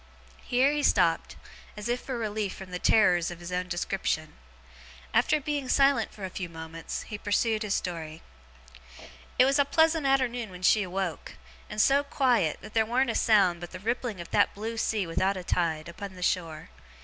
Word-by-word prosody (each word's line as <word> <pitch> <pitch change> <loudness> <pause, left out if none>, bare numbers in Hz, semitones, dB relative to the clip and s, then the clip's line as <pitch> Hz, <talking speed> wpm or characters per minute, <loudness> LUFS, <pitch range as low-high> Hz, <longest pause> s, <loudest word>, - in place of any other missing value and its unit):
Here 255 +3 +2
he 295 0 0
stopped, - - +2 0.4
as 210 - -5
if 245 +1 -1
for 260 -2 -4
relief 215 -3 -3
from 190 -1 -10
the 180 - -4
terrors 180 -6 +4
of 175 -1 -8
his 175 +1 -8
own 180 0 -2
description. 175 -3 -2 0.8
After 305 - +3
being 285 -2 -3
silent 275 -5 +3
for 200 - -7
a 185 - -6
few 180 -2 -5
moments, 165 0 -6
he 210 - -7
pursued 215 +2 +1
his 210 -3 0
story. 160 -3 -5 1.1
'It 255 - +7
was 275 +2 +2
a - - +6
pleasant 320 +1 +2
arternoon 245 -4 +1
when 180 0 -11
she 210 +3 +5
awoke; 185 -2 -4 0.4
and 210 - -5
so 275 +5 +4
quiet, 250 - +1
that - - -11
there 225 - +3
warn't 240 +3 +1
a - - -5
sound 195 -6 +3
but 175 - -7
the 185 - -6
rippling 230 0 -2
of 170 - -8
that - - +2
blue 220 +3 -4
sea 220 -3 0
without 190 +4 0
a 185 - -6
tide, 165 -3 -1
upon 190 +3 -8
the 180 - -7
shore. 165 -4 -2
205 Hz, 190 wpm, -28 LUFS, 180-245 Hz, 1.1 s, It